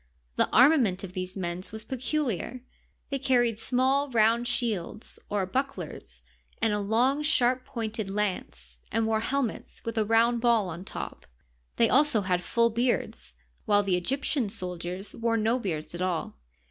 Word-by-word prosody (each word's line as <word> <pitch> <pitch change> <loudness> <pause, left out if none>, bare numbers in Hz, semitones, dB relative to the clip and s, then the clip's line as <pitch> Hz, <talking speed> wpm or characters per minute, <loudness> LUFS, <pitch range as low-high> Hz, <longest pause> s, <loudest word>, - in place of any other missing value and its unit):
The - - +2
armament 240 - +5
of 185 -2 -7
these 185 +1 -4
men 175 -1 -3
was 220 0 -8
peculiar; 255 - -2 0.5
they 275 - -1
carried 240 -4 +2
small 265 +4 +2
round 230 0 +3
shields 225 -4 -2
or 205 -2 0
bucklers 180 - -4 0.4
and 220 -2 +2
a 210 - 0
long, 240 +8 +2
sharp 255 -4 +2
pointed 220 -4 -4
lance, 180 - -3
and 225 0 +1
wore 220 0 +1
helmets 260 0 -2
with 230 -1 -1
a - - +3
round 230 +2 +3
ball 230 -5 +3
on 175 +2 -7
top. - - -7 0.5
They - - +4
also 280 -5 +4
had 180 -2 0
full 235 +5 +2
beards, 235 - -1 0.3
while 205 0 +4
the 190 -2 +1
Egyptian 260 - 0
soldiers 180 -1 -5
wore 230 0 0
no 225 +3 +1
beards 165 -9 -4
at 175 - -5
all. 175 - -2
225 Hz, 155 wpm, -28 LUFS, 190-245 Hz, 0.5 s, armament